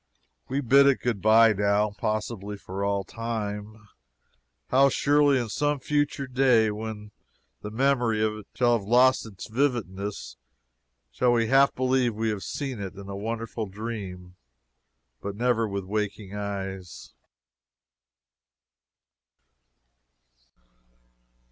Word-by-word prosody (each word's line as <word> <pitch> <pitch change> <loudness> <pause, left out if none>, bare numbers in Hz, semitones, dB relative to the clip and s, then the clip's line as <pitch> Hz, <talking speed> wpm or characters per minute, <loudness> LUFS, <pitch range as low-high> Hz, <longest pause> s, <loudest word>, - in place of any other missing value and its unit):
We 135 +2 -1
bid 140 +2 +5
it 140 - +3
good 115 -6 -1
bye, 110 +2 +6
now 105 +1 +1
possibly 105 0 -3
for 95 0 -6
all 100 -1 0
time. 110 0 -5 0.8
How 135 +2 +5
surely, 145 0 +3
in 120 - -2
some 145 +4 0
future 145 0 -1
day, 125 -4 +3
when 105 0 -6 0.5
the 105 - -6
memory 120 -1 +1
of 110 0 0
it 105 - -11
shall 120 -1 +3
have 100 - -11
lost 125 +1 +4
its 100 -4 -9
vividness, 110 - -2 0.7
shall 125 -1 +2
we 115 -2 +1
half 135 +1 +4
believe 130 -2 +1
we 110 +1 -1
have 105 -2 -3
seen 135 -1 -4
it 100 -1 -6
in 100 0 -10
a 100 - -5
wonderful 115 +1 -4
dream, 95 -4 -7 0.8
but 100 0 -5
never 115 0 +1
with 100 -1 -4
waking 105 0 -3
eyes! 95 -3 -6
110 Hz, 120 wpm, -26 LUFS, 100-125 Hz, 0.8 s, bye